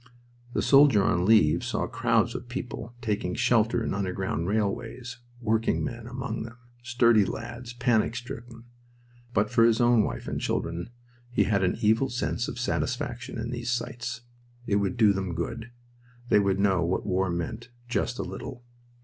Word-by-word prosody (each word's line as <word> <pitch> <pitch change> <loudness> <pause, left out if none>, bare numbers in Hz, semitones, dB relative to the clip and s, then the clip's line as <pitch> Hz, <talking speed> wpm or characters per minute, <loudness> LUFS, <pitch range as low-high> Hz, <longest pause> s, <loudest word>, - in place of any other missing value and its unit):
The - - 0
soldier 135 -7 +6
on 90 -1 +2
leave 100 -8 +5
saw - - -1
crowds - - +1
of 120 - -7
people 125 -2 -6
taking 100 -5 -1
shelter 120 -1 +2
in - - -2
underground 95 -3 -2
railways, 110 +4 -2 0.2
working 110 -1 +1
men 120 -2 -5
among 125 +2 -4
them, 115 +1 -8 0.2
sturdy 120 -2 +4
lads, 120 +5 -6
panic 120 -2 +1
stricken. 120 -1 -8 0.7
But 105 -1 +1
for 115 -1 +4
his 115 -1 +4
own 120 -2 +5
wife - - -4
and - - -3
children 85 +3 -2 0.4
he 120 - +2
had 100 -3 +1
an 90 - +1
evil 110 +5 +3
sense 120 0 -2
of - - -6
satisfaction 125 0 -2
in 115 +1 -4
these 120 0 -4
sights. 120 -1 -3 0.4
It 100 - +2
would 100 0 -1
do 110 -3 +5
them 95 -3 -3
good. 115 +8 -4 0.6
They 105 - +6
would 100 -1 +1
know 95 -3 +3
what 85 +3 -1
war 95 0 +1
meant 85 +8 -4 0.2
just 120 0 -1
a - - -2
little. 125 -1 -7
115 Hz, 165 wpm, -27 LUFS, 100-120 Hz, 0.7 s, soldier